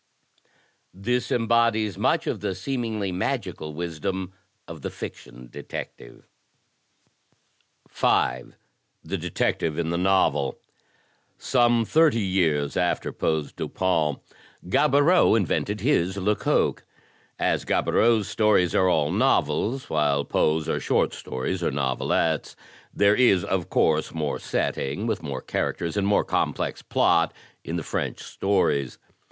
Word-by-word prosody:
This 120 +6 -1
embodies 115 -3 +2
much - - +1
of - - -2
the 100 -2 -3
seemingly 110 -2 -3
magical 80 -4 -3
wisdom 90 +3 -4 0.3
of - - -9
the - - -4
fiction 60 +1 -9
detective. - - -9 1.6
5. 60 0 0 0.5
The - - -4
Detective 75 -2 -1
in 85 -1 -1
the 85 - -1
Novel 90 -7 +1 0.8
Some 120 -2 +2
thirty 155 -2 +3
years 80 -7 0
after 90 -1 0
Poe's 80 -2 -2
Dupin, 80 -6 0 0.5
Gaboriau 145 - +4
invented 105 0 -1
his 100 - +1
Lecoq. 105 +2 +1 0.5
As - - 0
Gaboriau's 110 -3 +2
stories 105 -5 +2
are 95 -1 +3
all 75 -3 +1
novels, 115 - +1
while 70 -2 +1
Poe's 80 0 +1
are - - 0
short - - +1
stories 65 +9 -4
or - - +1
novelettes, 70 +4 -1 0.4
there 100 0 +3
is, 100 -8 +4
of 95 -3 -2
course, 80 +1 +1
more 75 -3 -2
setting, 95 +11 -2
with 110 -3 -1
more 70 -4 -5
characters 85 +1 -2
and 100 -1 0
more 100 - +2
complex - - -1
plot, - - +2 0.3
in 85 - -4
the 85 - -3
French - - -3
stories. 95 -9 0
95 Hz, 120 wpm, -25 LUFS, 80-110 Hz, 1.6 s, Gaboriau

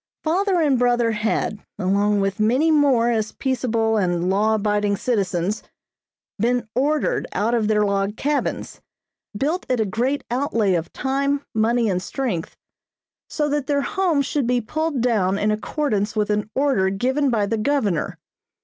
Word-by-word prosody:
Father 370 +3 +1
and 280 -5 +2
brother 240 -1 +2
had, 215 -1 -1
along 200 +2 +1
with 195 +1 -1
many 255 +9 +3
more 270 -6 +3
as 220 -2 -1
peaceable 230 -4 0
and 175 -2 0
law 215 +3 +2
abiding 205 -1 0
citizens, 195 -4 -1 0.8
been 245 +2 +1
ordered 290 +5 0
out 220 +4 0
of 225 -3 +1
their 210 -1 +2
log 200 +1 -1
cabins, 290 +1 -2 0.6
built 310 - -1
at 250 -2 +1
a 220 - +2
great 245 +8 -1
out 265 +2 -1
lay 205 -4 +3
of 170 -1 -2
time, 275 +1 -1
money 230 +1 +2
and 185 -3 0
strength, 195 -6 -4 0.7
so 300 -1 -1
that 290 -2 -1
their 285 -1 +1
homes 355 -8 +1
should 285 -3 -1
be 250 0 +2
pulled 310 +4 -2
down 205 -6 +1
in 210 +1 +1
accordance 215 -2 -1
with 210 -1 0
an 210 0 -1
order 265 -9 +2
given 260 +8 0
by 220 -4 +1
the 220 +2 -2
Governor. 215 - 0
230 Hz, 160 wpm, -22 LUFS, 205-275 Hz, 0.8 s, many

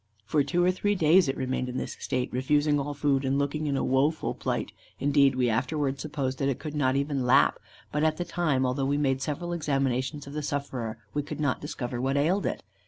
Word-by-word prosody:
For 145 +6 +2
two 175 +6 +1
or 180 - +4
three 205 +2 0
days 165 0 +5
it 135 - -1
remained 130 -1 -2
in 125 - -4
this - - -4
state, 125 -1 -2
refusing 145 +3 +2
all 145 +1 -3
food, 140 -1 +1
and 135 +1 +1
looking 145 +2 -1
in 140 -1 0
a - - 0
woeful 140 +5 +1
plight; - - -3 0.3
indeed, 140 -1 +4
we 125 -1 +2
afterwards 135 +4 0
supposed 140 -4 -3
that 140 - +1
it 135 - -1
could 150 -2 -6
not 130 -3 +1
even 140 -1 0
lap; 125 +2 +4 0.3
but 150 +1 0
at 155 -1 +2
the 175 - -2
time, 160 -6 0
although 130 +2 0
we 140 +1 +1
made 135 -2 +1
several 165 +5 -3
examinations 135 -2 -1
of 140 - -9
the 150 - -2
sufferer, 135 -6 -3 0.2
we 145 - 0
could 145 - -7
not 145 -4 0
discover 125 -4 -4
what 135 +2 0
ailed 175 +8 +2
it. - - -3
140 Hz, 225 wpm, -27 LUFS, 130-150 Hz, 0.3 s, days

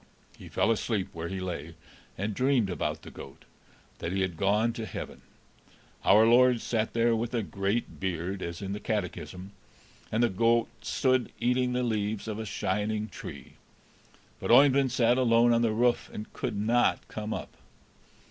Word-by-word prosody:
He - - -12
fell - - +2
asleep 105 -3 -1
where 85 0 -5
he 95 +2 -4
lay, 85 -3 -5 0.4
and 100 +3 -2
dreamed 125 -4 +2
about 90 - -3
the - - -10
goat, - - -12 0.5
that 85 - -3
he 95 +1 0
had 95 -3 -1
gone 105 +6 +2
to 110 -1 -5
heaven; - - -7 0.8
our 105 +3 +6
Lord 125 +1 +5
sat 110 -2 -1
there 115 0 +3
with 115 +2 -2
a 115 - 0
great 100 +4 -2
beard, 95 0 -3
as 85 +3 -5
in 100 0 -3
the 105 - -4
catechism, 95 -2 -4 0.6
and 110 +2 +2
the 120 - +3
goat 115 +4 +2
stood 130 +2 +1
eating 125 +1 +1
the 125 0 0
leaves 110 -2 -2
off 110 0 -4
a 110 - -5
shining 105 +3 -2
tree; - - -10 0.8
but - - -4
Oeyvind 135 -1 +6
sat 120 0 +3
alone 120 -1 +4
on 115 - +3
the 115 -2 +2
roof, 120 +2 +1
and 105 - -8
could - - -3
not 115 +4 +1
come 110 0 -5
up. - - -5
110 Hz, 170 wpm, -28 LUFS, 100-120 Hz, 0.8 s, our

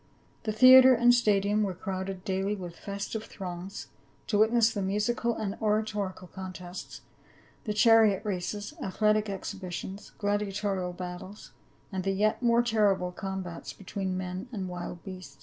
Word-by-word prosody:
The 215 - 0
theatre 255 +3 +9
and 240 +1 +5
stadium 210 -3 +2
were 195 -3 -1
crowded 190 0 -5
daily 195 +2 0
with 175 -3 -8
festive 200 +3 -5
throngs, 185 0 -7 0.4
to 205 - +1
witness 225 +1 +4
the 205 - -2
mu:ical 215 +4 0
and 205 -2 -2
oratorical 210 -3 -1
contests, 185 -1 -8 0.6
the 210 - -1
chariot 220 -2 +5
races, 205 +4 -3
athletic 215 +1 +1
exhibitions, 190 0 -6
gladiatorial 200 -2 -1
battles, 180 +3 -8 0.4
and 190 -1 -3
the 195 +1 0
yet 215 +4 +1
more 235 -1 +4
terrible 205 -6 +2
combats 185 -2 -6
between 190 -1 -4
men 185 +5 -5
and 195 -5 -4
wild 175 -1 -6
beasts. 185 -8 -9
200 Hz, 135 wpm, -29 LUFS, 185-215 Hz, 0.6 s, theatre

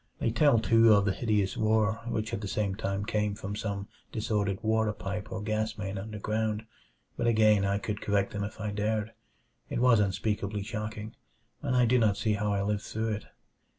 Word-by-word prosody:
They 115 - 0
tell, 140 +1 +4
too, 115 0 +5
of 100 -1 +3
the 100 - +2
hideous 105 -4 0
roar 110 0 +2
which 110 -1 -2
at 110 - -2
the 100 - -4
same 100 0 -1
time 100 0 -2
came 105 -1 0
from 100 -1 -5
some 100 -2 -3 0.2
disordered 105 -3 0
water 110 -1 +2
pipe 100 0 -5
or 110 - -4
gas 110 +1 -1
main 100 -1 -4
underground 110 +1 -2 0.5
but - - 0
again 110 -3 +4
I 100 0 +1
could 105 +1 -4
correct 100 -1 0
them 100 0 -2
if 105 +2 -6
I 105 -1 -2
dared. 105 +1 -1 0.6
It - - -2
was 120 -2 +5
unspeakably 105 0 -1
shocking, 105 +1 -5 0.5
and 135 -3 0
I 125 -1 +5
do 125 +2 +4
not 105 -3 +3
see 110 0 +1
how 105 0 0
I 100 -1 0
lived 105 0 0
through 110 +1 -3
it. 105 -1 -3
105 Hz, 195 wpm, -29 LUFS, 100-110 Hz, 0.6 s, too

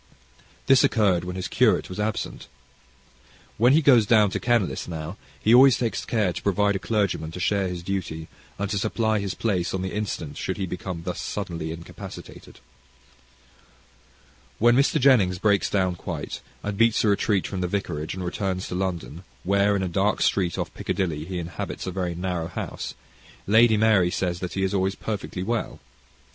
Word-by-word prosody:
This 135 -1 +5
occurred 95 -7 +3
when 90 0 -5
his 95 -2 -3
curate - - +2
was 90 - -8
absent. 105 +1 -3 1.1
When 120 +4 +5
he 155 +2 +4
goes 120 -7 +6
down 105 -3 +5
to - - -2
Kenlis 120 -6 0
now, 80 +1 -5 0.2
he 110 - +3
always 130 +1 +7
takes 115 -2 -2
care 105 -6 +1
to - - -6
provide 100 0 +2
a - - -1
clergyman 100 -7 -1
to 90 - -6
share 100 +1 +1
his 90 -1 -5
duty, 85 -4 -4 0.3
and 100 - -2
to 100 - 0
supply 110 +1 0
his 100 -3 -3
place 95 -6 -1
on 95 - -2
the 95 - -4
instant 90 -8 -4
should - - -3
he 95 - -2
become 90 -1 -5
thus 90 +1 -4
suddenly 85 -6 -4
incapacitated. 85 +1 -10 2.0
When 120 +2 +5
Mr. 140 +4 +3
Jennings 115 -10 +4
breaks 100 0 +2
down 95 -2 +1
quite, - - -5 0.2
and 105 0 -4
beats 115 -1 +4
a - - +2
retreat 100 -1 +1
from 95 -2 -4
the 90 - 0
vicarage, 85 -5 -3
and 95 - -5
returns 95 0 -2
to - - -5
London, 90 -3 -3 0.2
where, 100 +2 +3
in 95 - 0
a - - 0
dark 95 +4 +1
street 90 -4 +1
off - - -3
Piccadilly, 80 -5 -2
he 90 +1 -5
inhabits 85 -2 -5
a 95 - -3
very 90 -2 -2
narrow 90 -2 -2
house, - - -5 0.5
Lady 110 +1 +5
Mary 105 -5 +4
says 90 -1 -2
that 90 -1 -5
he 95 - -1
is 95 +1 0
always 95 0 +1
perfectly 100 -3 -4
well. 115 +2 -2
95 Hz, 180 wpm, -25 LUFS, 90-105 Hz, 2.0 s, always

